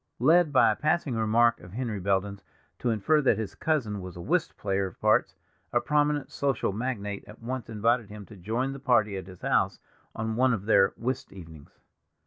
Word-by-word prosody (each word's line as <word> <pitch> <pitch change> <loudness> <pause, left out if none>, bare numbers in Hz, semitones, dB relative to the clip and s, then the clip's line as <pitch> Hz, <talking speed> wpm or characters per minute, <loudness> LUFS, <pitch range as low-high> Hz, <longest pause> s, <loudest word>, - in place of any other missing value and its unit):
Led 160 +5 +4
by 120 -5 +5
a - - -1
passing 155 -1 0
remark 115 +1 +3
of 90 +1 -13
Henry 115 -3 -3
Belden's 100 +1 -1 0.4
to 125 - -1
infer 135 +8 +2
that 135 - +3
his 105 -3 -4
cousin 110 -5 -1
was 90 -1 -9
a - - -8
whist 165 - -1
player 95 -1 -1
of 90 - -13
parts, - - +2 0.4
a 120 - +3
prominent 150 +1 0
social 135 -7 -1
magnate 105 -3 -4
at 105 +2 -13
once 120 0 -5
invited 115 +1 +1
him 105 -1 -9
to 110 - -13
join 115 +8 -2
the 135 - -8
party 120 -6 +2
at 95 -1 -6
his 90 -2 -13
house - - +1 0.4
on 110 0 -3
one 130 +1 +3
of 100 -2 -7
their 100 -3 +4
whist 130 +2 -3
evenings. 80 -6 -13
110 Hz, 195 wpm, -27 LUFS, 100-130 Hz, 0.4 s, by